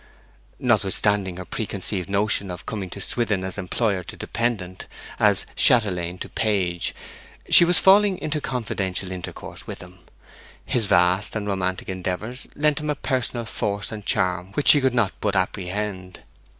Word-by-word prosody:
Notwithstanding 100 Hz, -4 st, +1 dB
her 90 Hz, -, -7 dB
preconceived 100 Hz, -1 st, -2 dB
notion 100 Hz, 0 st, 0 dB
of 90 Hz, -1 st, -7 dB
coming 100 Hz, -4 st, -4 dB
to 100 Hz, -, -8 dB
Swithin 105 Hz, -2 st, +1 dB
as 95 Hz, +1 st, -4 dB
employer 100 Hz, 0 st, -1 dB
to -, -, -10 dB
dependant, 100 Hz, -6 st, -3 dB, 0.3 s
as -, -, +3 dB
chatelaine 90 Hz, -7 st, +2 dB
to -, -, -4 dB
page, 95 Hz, -5 st, -1 dB, 0.6 s
she 175 Hz, -, +10 dB
was 175 Hz, 0 st, +3 dB
falling 195 Hz, 0 st, +5 dB
into 155 Hz, -2 st, -2 dB
confidential 95 Hz, -7 st, -3 dB
intercourse 90 Hz, -1 st, -8 dB
with -, -, -6 dB
him. 90 Hz, 0 st, -12 dB, 0.7 s
His 115 Hz, -4 st, +1 dB
vast 90 Hz, +4 st, +2 dB
and 105 Hz, -1 st, -3 dB
romantic 95 Hz, -2 st, -2 dB
endeavours 95 Hz, +6 st, -4 dB
lent 150 Hz, 0 st, +1 dB
him 150 Hz, 0 st, -4 dB
a 150 Hz, -, +1 dB
personal 130 Hz, -4 st, -2 dB
force 100 Hz, -2 st, -3 dB
and 105 Hz, -1 st, -7 dB
charm 90 Hz, -1 st, 0 dB
which 145 Hz, -, +3 dB
she 145 Hz, -, +8 dB
could 130 Hz, -2 st, +1 dB
not 110 Hz, -5 st, +2 dB
but 105 Hz, -2 st, 0 dB
apprehend. 95 Hz, 0 st, -3 dB
100 Hz, 150 wpm, -23 LUFS, 95-120 Hz, 0.7 s, she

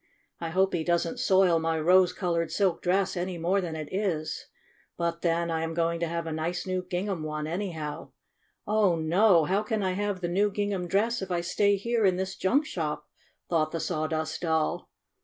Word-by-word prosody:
"I 165 Hz, -, -3 dB
hope 190 Hz, +3 st, +2 dB
he 170 Hz, -2 st, 0 dB
doesn't 170 Hz, 0 st, 0 dB
soil 185 Hz, -3 st, +4 dB
my 160 Hz, 0 st, 0 dB
rose 180 Hz, +3 st, +5 dB
colored 170 Hz, -3 st, -1 dB
silk 195 Hz, -4 st, +1 dB
dress 190 Hz, +2 st, +1 dB
any 180 Hz, 0 st, -3 dB
more 180 Hz, +4 st, +1 dB
than 170 Hz, -3 st, -4 dB
it 155 Hz, -2 st, -5 dB
is. 185 Hz, -6 st, -2 dB, 0.5 s
But 170 Hz, 0 st, -2 dB
then 170 Hz, 0 st, +1 dB
I 160 Hz, 0 st, -1 dB
am 165 Hz, 0 st, -3 dB
going 170 Hz, 0 st, 0 dB
to 170 Hz, -, -1 dB
have 170 Hz, 0 st, -3 dB
a 165 Hz, -, -4 dB
new 175 Hz, +4 st, -2 dB
gingham 185 Hz, -1 st, -2 dB
one, 155 Hz, 0 st, -3 dB
anyhow. 160 Hz, -3 st, -4 dB, 0.6 s
Oh, 210 Hz, -4 st, +3 dB
no! 170 Hz, +2 st, +4 dB
How 195 Hz, +5 st, +1 dB
can 215 Hz, -1 st, -2 dB
I 185 Hz, -, +1 dB
have 200 Hz, 0 st, -2 dB
the 175 Hz, -, -1 dB
new 200 Hz, +4 st, +2 dB
gingham 200 Hz, -3 st, -2 dB
dress 225 Hz, +6 st, +1 dB
if 190 Hz, -, -5 dB
I 175 Hz, -1 st, 0 dB
stay 200 Hz, +3 st, +2 dB
here 230 Hz, +3 st, 0 dB
in 190 Hz, -2 st, +4 dB
this 190 Hz, +1 st, -3 dB
junk 275 Hz, +11 st, +2 dB
shop?" 155 Hz, -, -3 dB, 0.4 s
thought 155 Hz, -3 st, +1 dB
the 165 Hz, -, -3 dB
Sawdust 155 Hz, -1 st, -2 dB
Doll. 160 Hz, -2 st, 0 dB
175 Hz, 195 wpm, -28 LUFS, 165-195 Hz, 0.6 s, rose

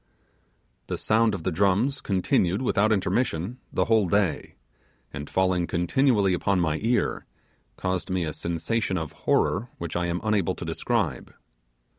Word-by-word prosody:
The -, -, -3 dB
sound 110 Hz, -1 st, +2 dB
of 85 Hz, -, -7 dB
the 95 Hz, -, 0 dB
drums 100 Hz, -, +1 dB
continued 95 Hz, +1 st, +1 dB
without 110 Hz, -3 st, +2 dB
intermission 110 Hz, 0 st, 0 dB
the -, -, +1 dB
whole 110 Hz, -4 st, +3 dB
day, 100 Hz, -2 st, 0 dB, 0.6 s
and 75 Hz, 0 st, -6 dB
falling 95 Hz, -2 st, +1 dB
continually 100 Hz, +2 st, +2 dB
upon 95 Hz, +2 st, +1 dB
my 80 Hz, -3 st, 0 dB
ear, 120 Hz, +2 st, 0 dB, 0.5 s
caused 90 Hz, 0 st, -2 dB
me 95 Hz, -1 st, 0 dB
a 75 Hz, -, -3 dB
sensation 95 Hz, +4 st, -2 dB
of 80 Hz, -3 st, -4 dB
horror 115 Hz, +6 st, 0 dB
which 85 Hz, -1 st, -5 dB
I 90 Hz, 0 st, 0 dB
am 85 Hz, +1 st, -1 dB
unable 105 Hz, -5 st, +1 dB
to -, -, -7 dB
describe. -, -, -2 dB
95 Hz, 145 wpm, -26 LUFS, 85-110 Hz, 0.6 s, whole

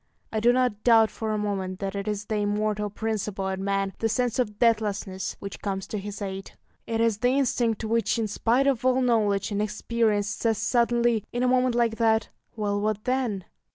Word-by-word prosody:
I 220 Hz, -, +1 dB
do 235 Hz, +3 st, +5 dB
not 245 Hz, -4 st, 0 dB
doubt 225 Hz, -2 st, +5 dB
for 220 Hz, -1 st, -3 dB
a 215 Hz, -, 0 dB
moment 195 Hz, -3 st, -2 dB
that 195 Hz, -1 st, -4 dB
it 200 Hz, 0 st, -4 dB
is 210 Hz, -1 st, -2 dB
the 215 Hz, 0 st, -2 dB
immortal 210 Hz, 0 st, 0 dB
principle 210 Hz, -2 st, -3 dB
in 190 Hz, 0 st, -3 dB
man, 195 Hz, -1 st, 0 dB
the 225 Hz, -, +1 dB
sense 245 Hz, +2 st, 0 dB
of 210 Hz, -4 st, -1 dB
deathlessness, 210 Hz, -4 st, 0 dB
which 200 Hz, 0 st, -7 dB
comes 195 Hz, -2 st, -3 dB
to 210 Hz, -, -3 dB
his 205 Hz, +1 st, -6 dB
aid. 195 Hz, 0 st, -6 dB, 0.3 s
It 225 Hz, -1 st, -1 dB
is 225 Hz, -2 st, +2 dB
the 245 Hz, -, +3 dB
instinct 235 Hz, -5 st, +1 dB
which, 220 Hz, 0 st, +1 dB
in 225 Hz, -2 st, 0 dB
spite 235 Hz, +5 st, +1 dB
of 265 Hz, -3 st, +1 dB
all 255 Hz, 0 st, +3 dB
knowledge 210 Hz, -4 st, +1 dB
and 205 Hz, 0 st, 0 dB
experience, 210 Hz, 0 st, 0 dB
says 225 Hz, +1 st, 0 dB
suddenly, 235 Hz, -2 st, +2 dB
in 245 Hz, +1 st, -1 dB
a -, -, +3 dB
moment 250 Hz, -1 st, +2 dB
like 230 Hz, -2 st, +1 dB
that, 220 Hz, -1 st, +2 dB, 0.3 s
"Well, 205 Hz, -2 st, -1 dB
what 215 Hz, 0 st, -1 dB
then?" 250 Hz, -7 st, -1 dB
215 Hz, 200 wpm, -26 LUFS, 205-235 Hz, 0.3 s, do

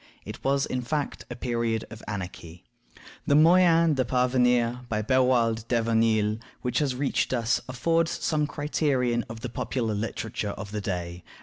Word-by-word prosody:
It -, -, -8 dB
was, 135 Hz, 0 st, +2 dB
in 130 Hz, -, -2 dB
fact, 145 Hz, +3 st, -3 dB
a 120 Hz, -, -5 dB
period 115 Hz, -2 st, -1 dB
of 110 Hz, -1 st, -9 dB
anarchy. 90 Hz, -4 st, -7 dB, 0.6 s
The 145 Hz, -, +4 dB
Moyen 165 Hz, 0 st, +5 dB
de 130 Hz, -2 st, +1 dB
parvenir, 125 Hz, -1 st, +2 dB
by 110 Hz, -1 st, -1 dB
Beroalde 120 Hz, -2 st, +2 dB
de 120 Hz, -, +2 dB
Venille, 110 Hz, -2 st, +2 dB, 0.3 s
which 125 Hz, -1 st, 0 dB
has 140 Hz, -4 st, 0 dB
reached 135 Hz, 0 st, 0 dB
us, 120 Hz, -1 st, +1 dB
affords 165 Hz, +6 st, +1 dB
some 155 Hz, -3 st, 0 dB
criterion 135 Hz, -5 st, 0 dB
of 110 Hz, 0 st, -8 dB
the 125 Hz, -, -4 dB
popular 115 Hz, -1 st, -2 dB
literature 105 Hz, -1 st, -3 dB
of 100 Hz, +1 st, -7 dB
the 105 Hz, -1 st, -3 dB
day. 90 Hz, -2 st, -4 dB
120 Hz, 160 wpm, -26 LUFS, 110-135 Hz, 0.6 s, Moyen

